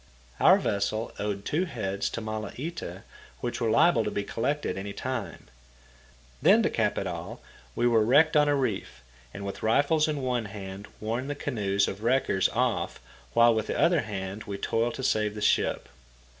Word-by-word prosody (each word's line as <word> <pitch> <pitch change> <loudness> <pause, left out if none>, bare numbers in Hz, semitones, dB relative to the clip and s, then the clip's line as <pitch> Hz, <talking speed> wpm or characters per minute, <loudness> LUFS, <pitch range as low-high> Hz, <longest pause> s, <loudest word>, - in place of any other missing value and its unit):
Our - - +7
vessel 105 +3 -1
owed 100 -1 -3
two 170 +5 0
heads 100 - -3
to 115 - -5
Malaita, 110 - -5 0.4
which 120 0 -4
were 115 - +1
liable 115 +2 +4
to - - -1
be 100 - -2
collected 145 +8 -2
any 100 +1 -5
time. 120 -10 -5 0.9
Then - - +6
to - - +1
cap - - 0
it - - -1
all, - - -5 0.4
we - - +1
were 115 -2 +4
wrecked 145 +8 +4
on 150 -1 +5
a 145 - +3
reef, 95 - -3 0.3
and 100 +2 -7
with 100 - -6
rifles 145 +7 +3
in 150 -3 -2
one 125 -3 0
hand 100 -1 -8
warned 115 +5 -3
the 145 - -2
canoes 100 -8 0
of 100 - -5
wreckers 115 -5 +2
off - - -1 0.4
while 115 0 +6
with 110 -1 -1
the - - -2
other 170 -3 +4
hand 100 -1 -5
we 100 -1 -5
toiled 115 +4 0
to 130 - -6
save 105 -4 +1
the - - -5
ship. 105 - +1
110 Hz, 180 wpm, -27 LUFS, 100-130 Hz, 0.9 s, Our